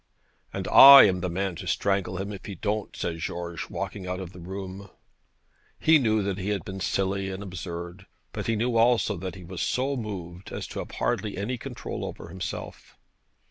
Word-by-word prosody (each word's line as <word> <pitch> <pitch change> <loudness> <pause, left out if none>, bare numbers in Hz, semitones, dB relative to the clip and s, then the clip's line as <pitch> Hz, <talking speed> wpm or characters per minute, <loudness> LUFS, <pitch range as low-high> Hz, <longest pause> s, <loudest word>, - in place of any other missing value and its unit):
'And - - -4
I 140 0 +11
am 95 -3 +3
the 90 - -1
man 95 +2 -2
to - - -7
strangle 95 -2 0
him 100 +2 -4
if 95 - -9
he 100 - -6
don't,' 105 +3 -3
said 85 -1 -3
George, 85 0 -5
walking 95 -3 -5
out 90 +1 -3
of 90 -2 -7
the 90 - -11
room. 95 +2 -7 0.9
He 160 -1 +5
knew 110 -5 +2
that 100 -1 -2
he 95 +2 -3
had 100 -5 -2
been 95 0 -6
silly 95 +1 -1
and 95 +1 -5
absurd, 85 +1 -7 0.3
but - - -4
he 115 - +1
knew 115 +2 0
also 115 -2 +3
that 95 +1 -5
he 95 - -10
was 85 +1 -6
so 135 +2 0
moved 95 -6 -6
as - - -4
to - - -5
have - - -6
hardly 105 -4 -1
any 115 +5 -3
control 125 -1 -6
over - - -7
himself. 95 +2 -7
95 Hz, 195 wpm, -26 LUFS, 90-105 Hz, 0.9 s, I